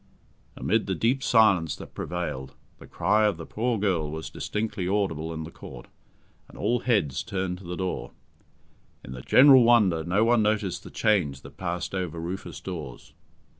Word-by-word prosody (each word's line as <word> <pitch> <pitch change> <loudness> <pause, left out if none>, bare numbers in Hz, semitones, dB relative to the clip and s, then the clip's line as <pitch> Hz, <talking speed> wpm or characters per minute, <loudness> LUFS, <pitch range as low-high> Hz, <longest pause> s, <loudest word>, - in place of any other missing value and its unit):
Amid 110 -1 0
the 95 - -1
deep 120 +9 +1
silence 100 - +3
that - - -11
prevailed, 85 -7 -5 0.2
the - - -13
cry 105 +5 +2
of 100 -5 -1
the 85 - -8
poor 115 +1 -1
girl 90 -7 0
was 80 +1 -6
distinctly 105 -4 -3
audible 90 -5 -1
in 80 -1 -5
the 80 - -9
Court, 60 -6 -11 0.6
and - - -14
all 120 +1 +1
heads 100 - 0
turned 95 -4 -3
to 95 - -13
the 90 0 -5
door. 90 -10 -3 1.0
In - - -9
the 65 -1 -7
general 130 - +7
wonder 105 -9 +4
no 95 +6 +1
one 120 -1 +4
noticed 105 -3 0
the - - -10
change 85 -11 +1
that - - -13
passed 90 -1 -4
over 90 -4 -3
Rufus 90 +4 -6
Dawes. 75 -9 -8
95 Hz, 170 wpm, -26 LUFS, 80-110 Hz, 1.0 s, general